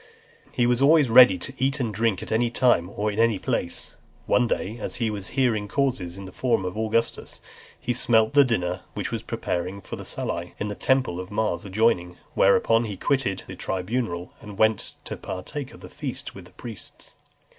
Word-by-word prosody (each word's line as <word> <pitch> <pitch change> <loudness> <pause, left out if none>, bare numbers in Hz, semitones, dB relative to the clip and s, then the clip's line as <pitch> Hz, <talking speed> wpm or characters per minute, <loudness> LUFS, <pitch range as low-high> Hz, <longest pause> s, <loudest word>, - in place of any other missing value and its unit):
XXXIII. - - -27
He 120 - +2
was 120 +1 +2
always 145 -1 +5
ready 120 -6 +8
to 135 +10 -4
eat 135 +2 +1
and 115 -5 -1
drink 110 -2 0
at - - -8
any 115 +2 +2
time 115 -8 +3
or 105 +1 0
in 105 - -4
any 115 -2 +4
place. - - -3 0.3
One 125 - +3
day, 110 +1 -2
as 110 - -4
he 115 -3 0
was 100 -3 -4
hearing 115 -6 +2
causes 100 -9 -1
in 100 - -8
the 95 - -9
Forum 115 -3 0
of 90 - -4
Augustus, 110 +1 -1 0.4
he 120 - -1
smelt 110 -1 +3
the 145 -1 +7
dinner 90 -7 -1
which - - -3
was - - -2
preparing 90 +3 -3
for - - -8
the - - -7
Salii, 85 +1 -4
in 105 - -3
the - - -3
temple 130 -6 +1
of 90 0 -6
Mars 105 0 -1
adjoining, 95 -4 +1 0.2
whereupon 115 +4 +4
he 105 -3 -5
quitted 130 -5 0
(324) - - -18
the - - -7 0.3
tribunal, 90 -5 -3
and 105 -2 -10
went 110 0 +2
to - - -4
partake 125 - -6
of - - -14
the - - -9
feast 140 -1 -5
with 95 -2 -11
the 90 - -18
priests. 110 -2 -9
110 Hz, 205 wpm, -25 LUFS, 95-125 Hz, 0.4 s, ready